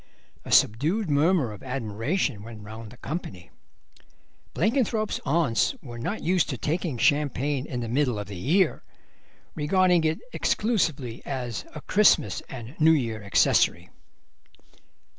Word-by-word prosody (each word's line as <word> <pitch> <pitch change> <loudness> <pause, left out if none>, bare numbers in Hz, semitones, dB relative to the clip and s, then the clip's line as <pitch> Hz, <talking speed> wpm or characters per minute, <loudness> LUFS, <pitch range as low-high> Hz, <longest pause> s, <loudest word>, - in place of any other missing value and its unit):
A - - -8
subdued 155 - +3
murmur 145 - +2
of 105 - -10
admiration 125 - -2
went 110 -1 -10
round 110 +1 -9
the 125 - -14
company. 100 - -6 1.0
Blenkinthrope's 225 -2 0
aunts 145 - +2
were 120 - -9
not 200 - -3
used 180 0 +2
to 130 - -3
taking 155 0 -2
champagne 145 0 +1
in 125 -2 -4
the 115 - -4
middle 125 -1 +1
of 105 - -4
the 100 - -8
year, 160 - +1 0.7
regarding 180 +2 +2
it 160 0 +1 0.2
exclusively 160 - 0
as 125 -5 -4
a 155 - -6
Christmas 200 - +3
and 125 -1 -8
New 160 +1 +6
Year 115 -7 -1
accessory. 90 -3 +2
140 Hz, 130 wpm, -26 LUFS, 115-170 Hz, 1.0 s, New